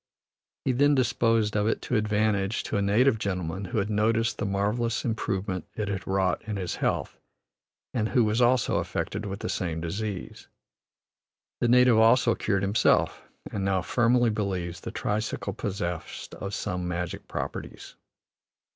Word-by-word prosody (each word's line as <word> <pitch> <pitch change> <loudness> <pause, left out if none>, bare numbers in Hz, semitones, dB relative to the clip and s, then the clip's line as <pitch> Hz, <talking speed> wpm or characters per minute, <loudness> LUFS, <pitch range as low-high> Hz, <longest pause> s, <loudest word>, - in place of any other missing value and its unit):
He 130 - +3
then 145 +3 +4
disposed 115 -4 +2
of 105 0 +2
it 115 - +1
to 125 - -1
advantage 105 -1 +1
to - - -3
a 100 - +2
native 110 +4 +3
gentleman 95 -1 -3
who 95 - -4
had 105 +1 0
noted 110 +2 +2
the 105 - -1
marvellous 105 +4 0
improvement 95 -6 -2
it 105 -2 -2
had 95 -1 -4
wrought 95 -1 +1
in 105 - -2
his 90 -2 -3
health, - - -1 0.7
and 110 -3 0
who 125 - +3
was 110 +3 +1
also 125 0 +3
affected 105 +1 -3
with 100 +1 -5
the - - -3
same 85 -3 -2
disease. 100 +4 -5 1.1
The 120 - +2
native 125 -1 +6
also 115 +1 +5
cured 100 -2 0
himself, 100 +3 +2 0.3
and 100 - -2
now 95 -2 +1
firmly 120 +3 +3
believes 95 -5 -2
the 115 - -6
tricycle 110 -1 -2
possessed 90 -4 -4
of 100 +1 -5
some 90 -1 -3
magic 90 -1 -4
properties. - - -6
105 Hz, 155 wpm, -27 LUFS, 95-115 Hz, 1.1 s, native